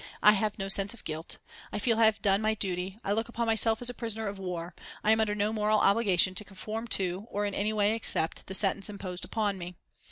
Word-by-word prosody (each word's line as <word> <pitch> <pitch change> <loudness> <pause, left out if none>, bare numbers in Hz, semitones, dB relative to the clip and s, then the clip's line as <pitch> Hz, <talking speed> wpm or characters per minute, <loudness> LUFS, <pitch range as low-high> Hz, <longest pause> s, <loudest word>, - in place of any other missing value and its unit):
I 210 - +9
have 210 0 0
no 195 -1 -3
sense 195 +2 +3
of - - -16
guilt. 160 +1 -4 0.3
I - - -3
feel 225 +2 +1
I 225 - +6
have 220 -1 +2
done 195 0 +3
my 220 0 +1
duty. 185 -1 -3
I 195 - -2
look 225 +3 0
upon 235 0 -2
myself 225 +1 +3
as 245 - +4
a - - -10
prisoner 225 -2 -3
of 200 -1 -5
war. 180 -2 -5 0.3
I 215 - +4
am 220 - +4
under 210 -1 0
no 210 +1 0
moral 215 0 +2
obligation 195 -3 +3
to 200 - -1
conform 215 +3 -6
to, 190 +2 -3
or 205 0 -2
in 200 - -3
any 210 +2 0
way 210 0 +2
accept, 185 -7 -1
the 190 - -3
sentence 195 +1 +3
imposed 185 -3 -6
upon 205 -3 -1
me. 175 0 -7
205 Hz, 245 wpm, -29 LUFS, 195-220 Hz, 0.3 s, I